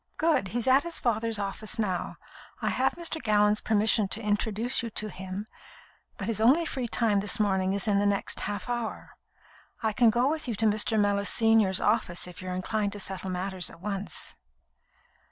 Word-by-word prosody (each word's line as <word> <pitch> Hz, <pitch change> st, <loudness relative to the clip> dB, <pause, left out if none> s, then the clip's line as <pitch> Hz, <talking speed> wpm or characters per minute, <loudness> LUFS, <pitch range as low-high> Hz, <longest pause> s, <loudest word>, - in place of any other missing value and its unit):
"Good. 310 Hz, -10 st, +2 dB
He's 235 Hz, +4 st, -2 dB
at 260 Hz, +2 st, +6 dB
his 340 Hz, +1 st, -3 dB
father's 230 Hz, -1 st, 0 dB
office 205 Hz, +3 st, -4 dB
now. 190 Hz, -5 st, -2 dB, 0.4 s
I -, -, -1 dB
have -, -, +1 dB
Mr. 330 Hz, -2 st, -3 dB
Gallon's 210 Hz, -1 st, +2 dB
permission 215 Hz, -1 st, +2 dB
to 205 Hz, -, 0 dB
introduce 220 Hz, +3 st, 0 dB
you 230 Hz, -, -4 dB
to 215 Hz, -1 st, -2 dB
him, 190 Hz, +2 st, -6 dB, 0.7 s
but 200 Hz, -, -5 dB
his 220 Hz, 0 st, -1 dB
only 280 Hz, +9 st, +4 dB
free 260 Hz, -5 st, -3 dB
time 220 Hz, -3 st, +2 dB
this 210 Hz, +2 st, +1 dB
morning 190 Hz, -2 st, +1 dB
is 200 Hz, +2 st, 0 dB
in 200 Hz, -1 st, +3 dB
the 205 Hz, -, +2 dB
next 200 Hz, -1 st, -1 dB
half 205 Hz, 0 st, -4 dB
hour. 240 Hz, -2 st, -4 dB, 0.7 s
I 220 Hz, -1 st, +1 dB
can 235 Hz, 0 st, +5 dB
go 240 Hz, +3 st, +2 dB
with 310 Hz, 0 st, -2 dB
you 235 Hz, -, -2 dB
to 225 Hz, -, 0 dB
Mr. 215 Hz, +1 st, +2 dB
Mellis 200 Hz, 0 st, +2 dB
senior's 225 Hz, -4 st, +4 dB
office, 210 Hz, -5 st, +1 dB
if 180 Hz, 0 st, -10 dB
you're 185 Hz, 0 st, -4 dB
inclined 205 Hz, +2 st, -1 dB
to 205 Hz, -, -7 dB
settle 190 Hz, -1 st, -4 dB
matters 185 Hz, 0 st, -2 dB
at 165 Hz, -, -14 dB
once." 195 Hz, -2 st, -4 dB
210 Hz, 190 wpm, -28 LUFS, 195-230 Hz, 0.7 s, at